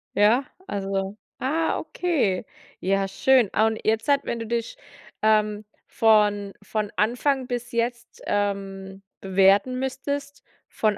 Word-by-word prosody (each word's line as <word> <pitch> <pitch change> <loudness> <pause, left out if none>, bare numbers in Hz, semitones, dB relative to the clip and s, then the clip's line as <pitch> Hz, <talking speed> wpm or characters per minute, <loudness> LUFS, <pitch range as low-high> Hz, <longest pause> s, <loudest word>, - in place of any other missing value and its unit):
ja? 220 +6 +4 0.2
Also 195 0 -3 0.2
ah, 315 +5 0
okay, 270 - -1 0.4
ja, 195 +1 +1
schön. 250 +3 +3
Ah. 220 +1 +4
Und 220 0 -2
jetzt 220 +4 +1
halt, 280 -1 +5
wenn 235 - -2
du 230 - -4
dich, 230 - -3 0.5
ähm, 215 -1 +2 0.2
von 210 -2 +3
von 210 0 -3
Anfang 250 +4 +1
bis 245 -1 -4
jetzt, 235 0 -3
ähm, 195 -1 -2 0.2
bewerten 195 +6 +3
müsstest, 280 +2 -4 0.2
von 215 -2 0
215 Hz, 125 wpm, -24 LUFS, 200-250 Hz, 0.5 s, halt